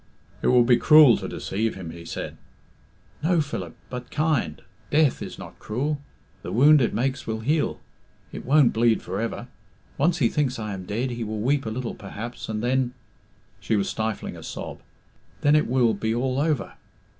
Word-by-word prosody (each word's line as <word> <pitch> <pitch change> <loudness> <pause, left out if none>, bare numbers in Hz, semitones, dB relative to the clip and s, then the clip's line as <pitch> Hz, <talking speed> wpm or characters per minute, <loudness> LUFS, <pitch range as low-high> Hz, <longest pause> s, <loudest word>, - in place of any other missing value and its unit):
"It - - 0
will 125 -1 +6
be 120 0 +5
cruel 150 +1 +7
to - - -5
deceive 110 +3 -2
him," 90 -4 -7
he 85 0 -10
said. - - -5 0.9
"No, 170 +2 +2
Philip, 95 - -4 0.2
but 125 -1 -6
kind. 150 - 0 0.3
Death 150 -2 +3
is - - -6
not - - -11
cruel. 140 +7 -2 0.4
The - - -6
wound 145 +5 +6
it 120 - +2
makes 130 +4 -2
will 110 0 -2
heal. 150 +6 0 0.5
It - - -7
won't 140 0 +4
bleed 115 0 +2
for 95 +4 -3
ever. 115 - -3 0.5
Once 170 +5 +3
he 125 - +3
thinks 130 -1 0
I 105 -2 -4
am 95 -1 -7
dead 115 +6 -2
he 120 -1 -4
will 110 0 -4
weep 135 +1 +1
a - - 0
little 120 +2 -4
perhaps, 115 +4 -7
and 110 0 -3
then 125 0 +1 0.3
" - - -35
she 110 - 0
was 100 -2 0
stifling 110 -1 -3
a - - -10
sob - - -7 0.6
"then 145 +1 +4
it 150 - +3
will 120 -2 +3
be 110 +2 -1
all 130 +2 0
over. 150 -3 0
120 Hz, 190 wpm, -25 LUFS, 110-145 Hz, 0.9 s, cruel